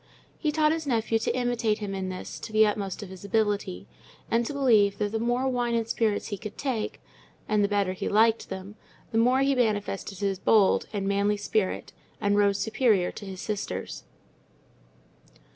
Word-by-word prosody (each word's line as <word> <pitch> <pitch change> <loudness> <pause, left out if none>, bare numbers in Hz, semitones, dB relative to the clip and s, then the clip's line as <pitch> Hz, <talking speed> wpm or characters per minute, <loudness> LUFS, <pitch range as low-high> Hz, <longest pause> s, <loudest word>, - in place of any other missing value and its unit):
He 305 - 0
taught 305 0 +3
his 320 -2 -2
nephew 225 -3 +1
to 225 - -1
imitate 240 -3 +1
him 205 -3 -5
in 190 -1 -3
this 185 0 -7
to - - -8
the 215 0 +5
utmost 205 -1 -2
of 195 - -9
his 190 0 -11
ability, 200 - -1 0.5
and 230 +1 +3
to - - -3
believe 220 -8 +3
that 205 -1 -1
the 225 - -1
more 240 +3 0
wine 245 -2 0
and 230 -1 0
spirits 220 -2 0
he 205 -3 -4
could 210 -2 -8
take, 255 -6 -2 0.5
and 210 -1 +2
the - - +3
better 200 -2 0
he 185 - -3
liked 225 +2 +3
them, 190 +1 -7 0.4
the 225 - +2
more 250 +3 +4
he 275 0 +3
manifested 205 -5 -1
his 195 -1 -1
bold, 205 -1 +4
and 200 -2 -2
manly 200 +1 +1
spirit, 205 -1 -1 0.3
and 205 -1 +1
rose 200 -1 +3
superior 220 -4 +2
to 205 - -9
his 190 -1 -7
sisters. 205 - -4
210 Hz, 185 wpm, -27 LUFS, 200-230 Hz, 0.5 s, the